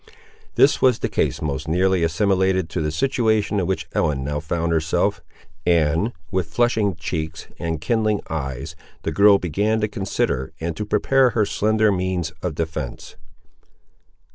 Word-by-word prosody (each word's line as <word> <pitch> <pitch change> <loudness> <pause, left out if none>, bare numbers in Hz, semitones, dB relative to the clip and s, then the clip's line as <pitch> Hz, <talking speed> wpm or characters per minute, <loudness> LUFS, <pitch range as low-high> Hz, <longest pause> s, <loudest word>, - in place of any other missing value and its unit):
This 140 - +4
was 125 -3 +4
the - - -2
case - - -1
most 75 +1 -3
nearly 90 +2 +2
assimilated 95 +1 +1
to 90 - -2
the 75 - 0
situation 110 - +1
in 90 - -1
which 95 - -1
Ellen 70 -3 0
now 75 +1 -2
found 85 +2 -2
herself; 85 +5 +1 0.4
and, 85 +5 +2 0.2
with 90 -4 -1
flushing 110 -2 +1
cheeks 80 -1 -4
and 80 -2 -2
kindling 110 +4 0
eyes, 70 0 -4 0.3
the - - -1
girl 100 0 +6
began 100 +6 0
to 105 - +1
consider, 95 -10 -2
and 80 0 -3
to 105 - -4
prepare 130 +5 +3
her 110 -3 +1
slender 110 +1 +2
means 90 -4 -1
of 90 -4 -3
defence. 80 -5 -5
90 Hz, 150 wpm, -22 LUFS, 80-105 Hz, 0.4 s, girl